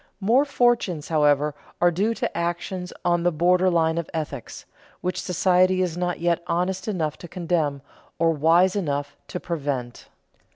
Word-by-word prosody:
More 235 +8 +3
fortunes, 240 - +1
however, 150 -1 +3 0.3
are 175 0 +4
due 205 +7 0
to - - -3
actions 175 +2 -3
on 175 -1 +2
the 175 +1 +2
border 180 +3 +3
line 165 -1 +2
of 170 - -5
ethics, 145 -6 -5 0.4
which 180 0 -2
society 185 +1 +2
is 175 -3 -2
not 175 0 -2
yet 170 0 +1
honest 180 +3 -1
enough 160 -8 -2
to 175 - -9
condemn 165 -6 -1 0.3
or 165 0 +3
wise 165 +5 +3
enough 145 -6 -2
to 180 - -5
prevent. 140 -8 -4
175 Hz, 155 wpm, -24 LUFS, 155-185 Hz, 0.4 s, are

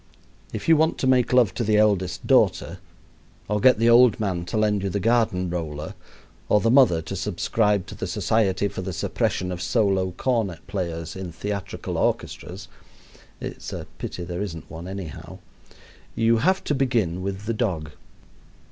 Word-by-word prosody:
If - - -6
you 165 - +7
want 160 +1 +2
to - - -2
make 130 -2 +3
love 125 -7 +4
to 120 - -2
the 105 -1 +2
eldest 100 -4 +1
daughter, - - +2 0.7
or 105 0 0
get 130 +1 +6
the 115 +1 +2
old 120 -2 +6
man 95 -5 -2
to 90 - -3
lend 105 -2 +2
you 100 - -1
the 100 - -2
garden 110 -4 +1
roller, 80 -3 -4 0.6
or 105 - +5
the 115 +2 +2
mother 120 - +5
to 90 +5 -5
subscribe 105 +1 0
to - - -9
the - - -5
Society 100 -3 +1
for 95 - -6
the 95 0 -5
Suppression 90 +2 -1
of 90 -1 -5
Solo 95 0 +1
Cornet 115 -9 -1
Players 85 -4 -4
in 95 -2 -6
Theatrical 100 +3 -4
Orchestras 90 +1 -2 0.7
(it's - - -7
a - - -6
pity 90 - -5
there 90 +1 -5
isn't 85 -6 -6
one, 85 +2 -8
anyhow), 95 -7 -7 0.8
you 115 0 +3
have 185 +11 +2
to - - -1
begin 115 -11 0
with 95 0 -4
the 115 - -1
dog. 90 -10 -2
100 Hz, 170 wpm, -24 LUFS, 90-115 Hz, 0.8 s, you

